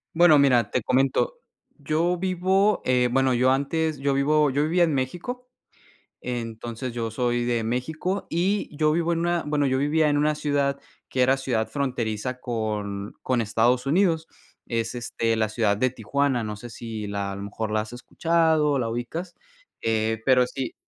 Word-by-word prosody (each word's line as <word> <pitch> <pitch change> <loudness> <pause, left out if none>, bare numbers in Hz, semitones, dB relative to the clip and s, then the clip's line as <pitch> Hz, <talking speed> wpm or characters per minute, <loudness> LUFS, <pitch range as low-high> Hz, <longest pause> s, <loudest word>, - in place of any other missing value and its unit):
Bueno, 165 -4 +6
mira, 120 -6 +3
te 125 - +1
comento. 135 - +1 0.4
Yo 160 +5 0
vivo, 190 +3 +1
eh, 125 -1 +2
bueno, 135 0 +2
yo 130 +2 +3
antes 155 +3 0
yo 140 0 +1
vivo 150 +1 +3
yo 140 +3 +1
vivía 175 +3 +3
en 160 -3 +2
México. 180 - -4 0.7
Entonces, 120 0 -5
yo 115 -1 -3
soy 120 0 0
de 120 -1 0
México 155 - -2
y 180 -2 -1
yo 155 0 +3
vivo 170 +1 +1
en 165 - 0
una, 175 0 +1
bueno, 145 -1 +1
yo 130 0 +1
vivía 150 +2 +2
en 145 0 +2
una 150 +1 +2
ciudad 140 -2 0 0.3
que 130 - 0
era 130 +2 +4
ciudad 125 -5 -1
fronteriza 125 -3 -3
con 105 -3 -3
con 125 -2 +1
Estados 120 +4 +1
Unidos. 165 +1 +2 0.4
Es, 115 0 -2
este, 115 -1 -1
la 110 -1 +1
ciudad 110 -2 +1
de 130 +3 +1
Tijuana. 130 +2 0
No 105 -1 -4
sé 120 +2 -10
si 110 -3 -6
la 100 -1 -3
a - - -6
lo 100 - -7
mejor 105 +2 -4
la 110 - +1
has 110 - -10
escuchado 160 +3 +1
o 140 - +1
la 115 - -1
ubicas. 140 +10 -5 0.5
Eh, 110 0 0
pero 125 -1 +5
sí, 130 -1 -5
130 Hz, 180 wpm, -25 LUFS, 115-155 Hz, 0.7 s, Bueno